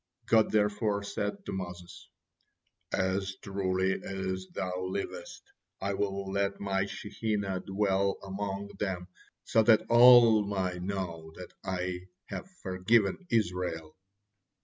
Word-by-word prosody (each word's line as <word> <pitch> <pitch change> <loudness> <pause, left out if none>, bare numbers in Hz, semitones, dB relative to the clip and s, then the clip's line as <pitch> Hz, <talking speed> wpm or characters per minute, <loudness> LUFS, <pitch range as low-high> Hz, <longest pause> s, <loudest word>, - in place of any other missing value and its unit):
God 110 -1 +4
therefore 105 -1 +1
said 200 - -3
to - - -4
Moses: 90 -1 -7 0.8
"As 95 +1 0
truly 95 -2 -1
as 95 -1 -3
thou 90 0 -3
livest, 95 +2 -5 0.4
I 100 +1 -1
will 100 0 -2
let 100 0 0
My 100 0 0
Shekinah 100 -2 -2
dwell 100 0 +1
among 100 +1 -4
them, 95 -3 -3 0.3
so 110 - +3
that 110 0 +5
all 120 -2 +8
my 95 -3 -2
know 90 -4 -4
that - - -10
I 90 -1 -3 0.2
have 190 - -5
forgiven 100 - +1
Israel. 90 - -1
95 Hz, 115 wpm, -30 LUFS, 95-105 Hz, 0.8 s, all